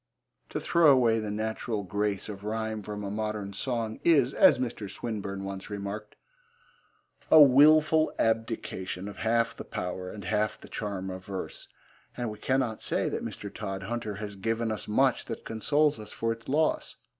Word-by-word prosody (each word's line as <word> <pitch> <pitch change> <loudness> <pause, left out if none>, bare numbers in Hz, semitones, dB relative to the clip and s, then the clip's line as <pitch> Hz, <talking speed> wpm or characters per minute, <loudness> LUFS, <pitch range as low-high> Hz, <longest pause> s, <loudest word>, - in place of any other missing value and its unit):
To - - -3
throw 170 -3 +4
away 120 -4 +4
the 110 -1 -3
natural 110 0 -2
grace 100 +1 -1
of 100 -2 -7
rhyme 110 0 -2
from 105 +1 -6
a 100 - -4
modern 105 -1 -3
song 115 0 -2
is, 140 -6 +4
as 140 - +6
Mr. 120 -5 -4
Swinburne 100 -2 -4
once 95 0 -6
remarked, 105 +1 -5 1.1
a - - +9
wilful 155 +3 +6
abdication 110 -4 -1
of 105 - -8
half 115 +1 +1
the - - -7
power 90 +1 -4
and 100 -1 -8
half 105 +2 0
the - - -13
charm 95 -3 -4
of 95 0 -7
verse, 95 -2 -6 0.5
and 120 -3 -2
we 105 - -9
cannot 130 -4 0
say - - 0
that - - -3
Mr. - - -6
Todhunter 105 +3 -4
has 100 0 -6
given 115 +3 -1
us 110 - -4
much 130 +4 +2
that 115 - -6
consoles 145 +5 +1
us 105 - -9
for 115 - -1
its 115 +1 -7
loss. 155 +3 +1
110 Hz, 170 wpm, -28 LUFS, 100-120 Hz, 1.1 s, a